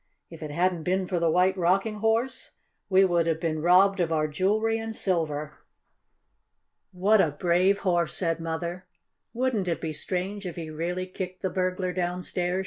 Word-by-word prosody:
If 165 - -11
it 155 - -5
hadn't 175 +2 0
been 185 +3 0
for 180 -1 -1
the 170 -1 +2
White 180 +3 +3
Rocking 195 +4 +1
Horse 225 +4 -1 0.3
we 190 0 +5
would 170 -2 +1
have 160 -1 0
been 155 -2 -2
robbed 185 +3 +5
of 170 -2 0
our 155 -1 +1
jewelry 215 +8 +1
and 225 0 -5
silver." 155 -6 -2 1.3
"What 195 +3 +3
a 160 - +2
brave 180 +6 +2
Horse!" 175 -4 +1
said 165 -3 -1
Mother. 170 +2 -4 0.4
"Wouldn't 240 -6 -1
it 170 - -1
be 160 -2 -4
strange 190 +4 -3
if 175 - -6
he 160 -2 -6
really 175 +4 -3
kicked 185 0 -7
the 190 - -1
burglar 185 -1 -1
downstairs?" 180 0 -2
180 Hz, 170 wpm, -26 LUFS, 165-190 Hz, 1.3 s, we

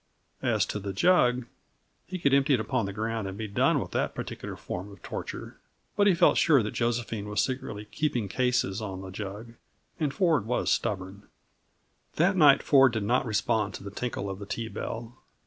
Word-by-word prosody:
As - - +2
to 105 - -4
the 100 -1 -5
jug, 125 - +3 0.6
he 185 - -4
could 140 -6 +2
empty 140 0 +4
it - - -2
upon 110 -1 -1
the - - -4
ground 110 0 -3
and 95 0 -6
be 110 0 -4
done 100 - +2
with - - -5
that - - -1
particular - - -6
form 95 +3 -6
of 100 - -15
torture. - - -6 0.4
But 205 0 +4
he 190 - +5
felt 170 - +4
sure 145 -8 +5
that 105 - -3
Josephine 115 -3 -2
was 105 - -1
secretly 110 -5 -4
"keeping 120 -1 -1
cases" 125 -3 0
on 95 -3 -5
the 95 -1 -8
jug; 105 +4 -7 0.5
and 150 -3 0
Ford 160 - +2
was 125 - 0
stubborn. 95 0 -2 0.9
That 175 +4 +3
night 145 -6 +6
Ford 135 -4 +5
did 110 -3 -1
not 120 +4 +1
respond 110 0 0
to - - -9
the 100 - -7
tinkle 110 -2 -3
of 95 0 -5
the 100 - -8
tea 115 +2 -4
bell. 115 +3 -6
115 Hz, 195 wpm, -28 LUFS, 100-135 Hz, 0.9 s, night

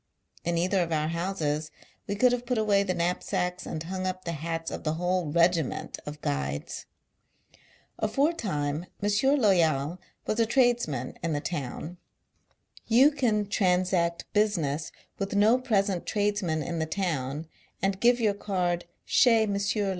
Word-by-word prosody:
In 170 0 0
either 185 +3 +2
of 170 -1 -2
our 155 -1 0
houses, 165 -3 -2 0.4
we 200 - -1
could 250 +4 +4
Lave 245 0 -2
put 250 -1 0
away 210 -2 +3
the 185 -2 -1
knap 175 +1 0
sacks 180 -2 -2
and 155 - -4
hung 185 +2 -3
up 185 0 -4
the 170 - -2
hats, 165 +1 -4
of - - -6
the 155 - 0
whole 175 -2 0
regiment 170 -3 +1
of 150 0 -7
Guides. 70 +1 -3 1.1
Aforetime, 200 - 0
M. 210 +8 +2
Loyal 170 - +2 0.3
was 215 - -1
a 230 - +3
tradesman 235 - +1
in 165 -2 -1
the 145 - 0
town. 160 +2 -5 0.9
You 255 +6 +6
can 230 -8 +1
transact 180 -3 +1
business 165 -8 0 0.3
with 195 0 -2
no 220 +5 +5
present 200 -7 0
tradesman 205 -7 0
in 170 +1 -3
the 160 - -1
town, 155 -5 -2 0.3
and 195 0 0
give 240 +2 +4
your 215 -3 +2
card 180 -4 -1
" - - -48
chez 230 -3 +5
M. 205 -2 -1
180 Hz, 155 wpm, -28 LUFS, 160-210 Hz, 1.1 s, You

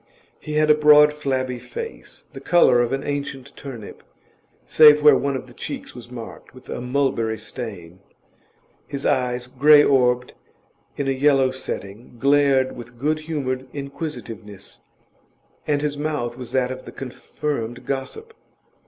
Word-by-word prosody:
He 150 - -7
had 155 0 +4
a - - +8
broad, 150 0 +6
flabby 130 -4 -2
face, 460 - -8
the - - -8
colour 150 -8 +4
of 120 - -1
an 135 0 -2
ancient 140 -2 -5
turnip, 125 -7 -9 0.6
save 150 -1 +7
where 150 - +8
one 140 -1 -1
of 130 - -5
the 125 - -16
cheeks - - -7
was 120 -1 -11
marked 120 0 -10
with 130 - -15
a - - -4
mulberry 125 -4 0
stain; 100 -6 -8 0.9
his 140 0 -6
eyes, 125 -1 0
grey 145 +4 +6
orbed 125 -3 +2 0.6
in 140 - -2
a - - +2
yellow 135 -1 +3
setting, 115 -3 -7
glared 140 0 +3
with 120 0 -11
good 155 +5 0
humoured 135 -5 -3
inquisitiveness, 120 - -8 0.9
and 145 -1 0
his 145 -1 -1
mouth 145 -6 -2
was 125 -2 -8
that 130 -1 +1
of 130 0 -6
the - - -11
confirmed 125 -2 -5
gossip. 440 - -5
130 Hz, 145 wpm, -22 LUFS, 125-145 Hz, 0.9 s, a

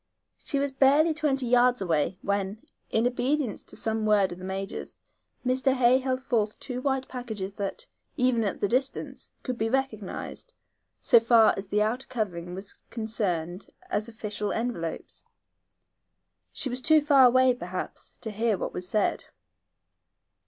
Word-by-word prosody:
She 285 - 0
was 280 0 0
barely 280 +4 +4
twenty 290 -4 0
yards 245 +1 +4
away 170 -1 0
when, 200 +1 -2 0.2
in 225 +1 +1
obedience 250 0 0
to - - -12
some 220 0 -1
word 210 -3 +3
of 175 - -7
the - - -10
major, 195 +1 -4 0.6
Mr. 260 +1 +2
Hay 255 0 +4
held 260 0 -2
forth 220 -5 0
two 250 -2 -5
white 265 -1 0
packages 220 -6 -5
that, 205 - -5 0.3
even 250 -3 +2
at 200 - -2
the 205 - +3
distance, 260 +5 -1
could 250 -3 -4
be 225 +1 +1
recognized, 265 - -3 0.4
so 235 - +6
far 230 -1 +5
as 195 0 -6
the 210 +2 +2
outer 240 +5 -2
covering 180 -8 -3
was 195 +1 -6
concerned, 195 -6 -3 0.2
as 210 +2 0
official 210 -2 -3
envelopes. 225 -9 -3 1.3
She - - -3
was 255 0 -2
too 315 +2 +5
far 280 -3 +6
away, 255 +1 +5
perhaps, 180 -6 -6
to 220 - -4
hear 220 0 +1
what - - -4
was 180 0 -4
said. 215 - +1
230 Hz, 150 wpm, -27 LUFS, 200-260 Hz, 1.3 s, so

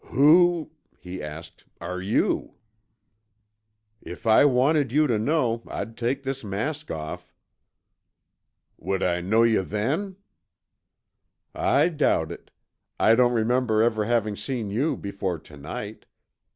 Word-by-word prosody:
"Who," 160 +4 +4 0.3
he 90 +1 -8
asked, 75 +2 -9 0.2
"are 90 +2 -5
you?" 100 +4 0 1.5
"If - - -10
I 110 +5 +6
wanted 140 +1 +2
you 150 +3 +3
to 120 -6 +1
know, 120 -2 0
I'd 115 - -6
take 125 +4 -2
this 135 -1 -4
mask 140 +10 -4
off." 75 -1 -6 1.5
"Would 95 +2 -2
I 90 -1 0
know 110 +6 +3
yuh 115 -3 +3
then?" 135 - -2 1.4
"I 340 - +2
doubt 145 - +1
it - - -10 0.5
I 110 - +5
don't 120 +1 +4
remember 115 -1 +2
ever 110 -2 +1
having 110 -2 0
seen 115 -4 -4
you 135 +10 0
before 100 -3 -4
tonight. 80 +8 -9
115 Hz, 120 wpm, -25 LUFS, 100-140 Hz, 1.5 s, I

